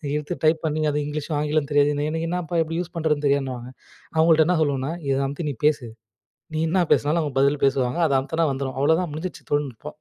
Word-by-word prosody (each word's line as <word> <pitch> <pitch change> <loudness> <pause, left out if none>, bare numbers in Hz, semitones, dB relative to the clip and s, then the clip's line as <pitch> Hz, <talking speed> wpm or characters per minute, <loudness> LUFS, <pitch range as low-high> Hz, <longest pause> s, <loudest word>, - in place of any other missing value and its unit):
எழுத்து 150 +3 -3
டைப் 160 0 +3
பண்ணி 155 0 0
அது 150 - -1
இங்கிலீஷும் 150 +1 -3
ஆங்கிலம் 150 -1 0
தெரியாது. 145 0 +4 0.2
எனக்கு 160 +1 -2
என்னப்பா! 175 -1 -2
எப்பிடி 165 +1 -4
யூஸ் 175 0 -8
பண்ணுறதுன்னு 150 -2 0
தெரியாதுன்னுவாங்க. 130 -3 -1 0.5
அவுங்கள்ட்ட 160 -1 +5
என்ன 180 -2 +2
சொல்லுவன்னா, 140 -1 -1 0.2
இத 135 - +2
அமுத்தி 145 +3 -4
நீ 135 - -7
பேசு. 145 -5 +2 0.7
நீ - - 0
என்ன 180 0 +2
பேசினாலும் 155 +3 +1
அவுங்க 145 -3 -4
பதில் 140 +1 +2
பேசுவாங்க. 135 +2 +1
அத 140 - 0
அமுத்துன்னா 160 +4 0
வந்துரும். 135 -1 -4
அவ்ள 160 +3 +4
தான் 175 -4 -4
முடிஞ்சிருச்சு 160 +4 -6
தொழில்நுட்பம். 145 -2 -3
150 Hz, 200 wpm, -23 LUFS, 140-160 Hz, 0.7 s, அவுங்கள்ட்ட